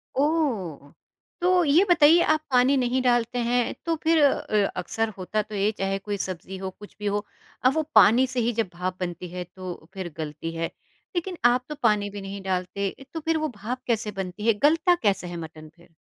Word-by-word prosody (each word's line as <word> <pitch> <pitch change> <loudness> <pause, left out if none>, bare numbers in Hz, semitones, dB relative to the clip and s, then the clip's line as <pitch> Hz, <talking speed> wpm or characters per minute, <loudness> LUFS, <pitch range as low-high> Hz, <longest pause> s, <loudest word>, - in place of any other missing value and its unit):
ओह! 250 - 0 0.5
तो 360 0 +4
ये 300 +6 +5
बताइए 330 0 +6
आप 310 - 0
पानी 255 +2 +4
नहीं 255 0 +1
डालते 245 -1 +1
हैं 245 0 +1
तो 335 -1 +1
फ़िर 320 -1 +4
अ 280 - +6
अ, 210 -2 +1
अक्सर 225 +5 -1
होता 195 +3 -1
तो 210 0 -8
ये 200 +1 +2
चाहे 195 0 -1
कोई 205 +1 -4
सब्ज़ी 190 0 -5
हो 190 0 -4
कुछ 205 - -12
भी 210 - -6
हो 205 0 0 0.4
अ, - - +8
वो 315 +4 0
पानी 240 +5 +7
से 255 -1 -3
ही 235 0 +1
जब 205 - -4
भाप 180 +1 -3
बनती 180 0 -4
है 180 +1 -5
तो 180 0 -8 0.2
फ़िर 190 -3 -5
गलती 155 +1 -5
है। 165 0 -1 0.5
लेक़िन 350 0 -2
आप 250 +1 +4
तो 300 - -4
पानी 210 -3 +3
भी 200 0 -7
नहीं 195 +1 -6
डालते 190 +1 -1 0.2
तो 325 - -3
फ़िर 320 +1 0
वो 310 - 0
भाप 245 +5 -4
कैसे 220 -3 0
बनती 195 +2 -5
है? 230 - +6
गलता 325 - +4
कैसा 195 -4 +1
है 175 -1 -6
मटन 155 -1 -9
फ़िर? 170 - -20
210 Hz, 210 wpm, -25 LUFS, 185-260 Hz, 0.5 s, अ